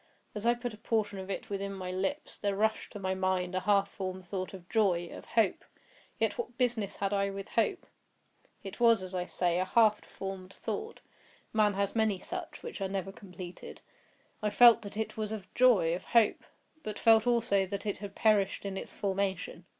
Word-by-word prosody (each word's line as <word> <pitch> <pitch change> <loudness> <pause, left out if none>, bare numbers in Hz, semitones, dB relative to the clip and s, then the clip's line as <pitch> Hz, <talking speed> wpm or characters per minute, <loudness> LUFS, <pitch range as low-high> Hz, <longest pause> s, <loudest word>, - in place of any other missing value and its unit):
As 210 +2 -3
I 240 - +5
put 240 -1 -5
a 215 - -12
portion 215 -4 -1
of 190 0 -7
it 195 - -5
within 200 0 -3
my 185 -2 -5
lips, 195 +12 -3
there 200 -1 -1
rushed 220 +2 0
to - - -6
my 190 -1 -1
mind 185 -1 0
a 185 - +1
half 200 0 +3
formed 185 -1 -6
thought 185 0 -4
of 185 -3 -11
joy—of 185 -6 0
hope. 220 -5 +1 0.5
Yet - - 0
what 255 - -5
business 240 -5 0
had 195 0 -1
I 200 0 +1
with 195 0 -6
hope? 235 - 0 0.8
It 195 +2 -8
was, 230 -4 +5
as 185 0 -7
I 180 -1 -1
say, 175 -1 0
a 185 - +1
half 215 +1 +4
formed 195 -1 -7
thought—man 210 -2 -3
has 200 +1 -1
many 220 -3 +2
such, 360 - -7
which 470 - -7
are 190 - -1
never 195 -1 -3
completed. 180 -2 -10 0.6
I 210 - +1
felt 235 +2 +7
that 205 -1 -9
it 220 0 -3
was 215 -1 -2
of 215 -3 -5
joy—of 190 -9 +4
hope; 230 -3 +3 0.4
but 215 -5 -5
felt 225 0 +5
also 225 -5 +2
that 200 +2 -5
it 205 -3 -2
had 200 -1 -7
perished 205 -3 +2
in 195 -1 -3
its - - -6
formation. 190 -3 -2
200 Hz, 190 wpm, -31 LUFS, 190-220 Hz, 0.8 s, felt